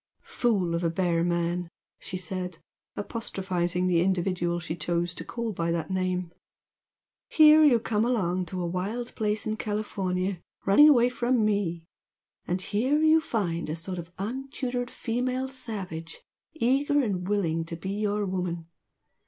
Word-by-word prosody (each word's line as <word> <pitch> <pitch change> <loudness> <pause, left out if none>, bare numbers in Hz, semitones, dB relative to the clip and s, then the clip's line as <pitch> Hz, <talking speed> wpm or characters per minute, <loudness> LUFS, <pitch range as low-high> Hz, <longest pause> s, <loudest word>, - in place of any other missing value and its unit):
"Fool 200 -8 0
of 170 +1 -1
a 165 - +2
bear 170 -1 +1
man!" 175 0 0 0.3
she 185 - -5
said, 180 -1 -4 0.4
apostrophising 185 -5 -2
the 175 -2 +3
individual 180 -1 0
she 160 -1 -4
chose 170 +1 -1
to - - -7
call 235 -1 -4
by 170 -2 -1
that 170 0 -2
name 185 -2 -1 1.0
"Here 310 0 +7
you 260 -6 +6
come 215 -1 0
along 185 -7 0
to 180 +1 -4
a - - -1
wild 200 +8 -3
place 210 -1 -1
in 215 0 -2
California 195 -4 -2 0.2
running 295 +11 +8
away 245 -4 +5
from 245 -2 +1
ME, 185 -6 0 0.6
and 180 +2 0
here 245 +10 +1
you 315 +1 +6
find 175 - -2
a 155 - -1
sort 180 +2 -5
of 170 0 -8
untutored 245 +3 -3
female 255 +3 -2
savage 190 -11 -5 0.3
eager 285 +1 +2
and 185 -5 -2
willing 170 -5 0
to 165 - -5
be 190 +4 -5
your 205 0 0
'woman!' 180 -3 -3
190 Hz, 150 wpm, -27 LUFS, 175-230 Hz, 1.0 s, running